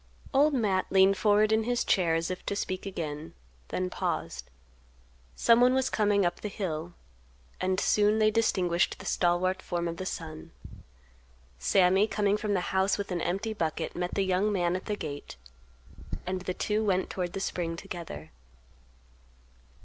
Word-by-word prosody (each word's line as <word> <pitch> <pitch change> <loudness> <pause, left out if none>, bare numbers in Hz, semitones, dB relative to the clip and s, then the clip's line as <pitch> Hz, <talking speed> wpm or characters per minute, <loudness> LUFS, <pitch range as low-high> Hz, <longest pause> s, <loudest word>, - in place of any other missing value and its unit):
Old 285 +2 +4
Matt 200 -6 +1
leaned 195 0 +5
forward 210 +1 +3
in 220 0 +3
his 245 0 +1
chair 170 -4 +2
as 165 +2 -1
if 185 - -5
to 200 - -1
speak 190 -1 -3
again; 155 -4 -5 0.3
then 185 - -2
paused; - - -3 0.9
someone 245 - +5
was 265 -1 +1
coming 205 -2 +2
up 175 - -1
the - - -3
hill; 175 -4 -4 0.7
and 185 0 +1
soon 210 +1 +3
they 215 0 +4
distinguished 185 -6 +1
the - - -11
stalwart 180 +1 +1
form 175 -1 -2
of 165 0 -4
the 185 - -4
son. 160 -1 -7 1.1
Sammy 190 - +4
coming 205 -2 +1
from 210 -1 -1
the 180 - +1
house 190 +1 +2
with 200 -2 -4
an 175 -2 -1
empty 195 +5 -1
bucket 160 -7 -3
met 180 0 -3
the 195 - +1
young 190 +3 +1
man 175 -3 +1
at 185 - -5
the 210 - -1
gate, 145 -7 -7 0.9
and 185 0 -2
the 185 0 -3
two 215 +1 0
went 190 -3 0
toward 180 -2 -3
the - - -3
spring 170 -3 -2
together. 160 - -8
185 Hz, 165 wpm, -29 LUFS, 175-210 Hz, 1.1 s, leaned